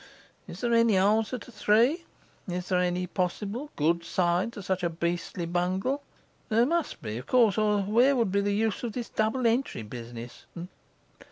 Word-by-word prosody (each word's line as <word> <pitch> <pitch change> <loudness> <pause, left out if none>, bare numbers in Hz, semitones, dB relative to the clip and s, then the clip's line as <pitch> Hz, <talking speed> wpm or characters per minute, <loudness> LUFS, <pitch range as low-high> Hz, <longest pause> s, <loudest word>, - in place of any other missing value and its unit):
Is - - -9
there 240 -1 +1
any 230 -3 +4
answer 215 +5 +2
to 245 - -12
No. - - -22
3? 245 - +3 0.4
Is 180 0 -4
there 180 -1 +2
any 180 0 0
possible 200 - -3
good 170 +3 +1
side 180 +5 0
to 205 - -8
such 185 0 -1
a 170 - 0
beastly 170 +1 -3
bungle? 185 +10 -1 0.5
There 230 +2 +4
must 335 +3 -1
be, 110 0 -4
of 125 - -11
course, 230 -6 +4
or 210 -1 +2
where 240 +7 +4
would 230 -6 +1
be 200 +1 +2
the 205 0 0
use 220 -1 0
of 235 -3 -4
this 240 0 -5
double 220 +4 0
entry 230 - +1
business? 120 +1 -9
200 Hz, 180 wpm, -28 LUFS, 175-235 Hz, 0.5 s, any